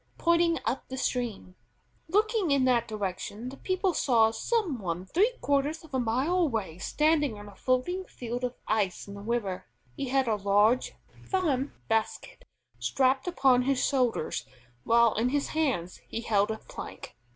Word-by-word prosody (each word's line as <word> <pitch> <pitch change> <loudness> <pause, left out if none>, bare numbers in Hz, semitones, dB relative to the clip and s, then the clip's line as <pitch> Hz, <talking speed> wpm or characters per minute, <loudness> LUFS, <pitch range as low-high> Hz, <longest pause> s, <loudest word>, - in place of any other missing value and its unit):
pointing 340 0 +3
up 265 - -2
the 260 - -5
stream. 240 -8 -2 0.5
Looking 420 +1 +2
in 280 -2 +3
that 245 -2 +2
direction, 210 +2 -4
the 270 - -10
people 370 +2 0
saw 230 -7 +3
some 360 - -1
one 180 -2 -3
three 405 - +2
quarters 285 +3 0
of 310 -3 -16
a 260 - +1
mile 255 +9 +1
away 225 - -1
standing 295 - +1
on 205 0 -10
a 205 - -11
floating 255 - 0
field 245 -3 -6
of 250 0 -2
ice 205 -4 0
in 200 - -8
the 200 - -8
river. 205 - -2 0.3
He 275 - -3
had 265 -1 +2
a 220 -2 +1
large 205 +5 +2 0.3
farm 295 -8 0
basket 225 - -2 0.3
strapped 265 +1 +1
upon 270 -8 +4
his 270 +1 +1
shoulders, 250 - 0 0.4
while 235 -1 +5
in 230 +3 +1
his 285 +1 0
hands 260 - -1
he 230 - -4
held 205 -3 +2
a 220 - -2
plank. - - -9
255 Hz, 165 wpm, -28 LUFS, 220-300 Hz, 0.5 s, while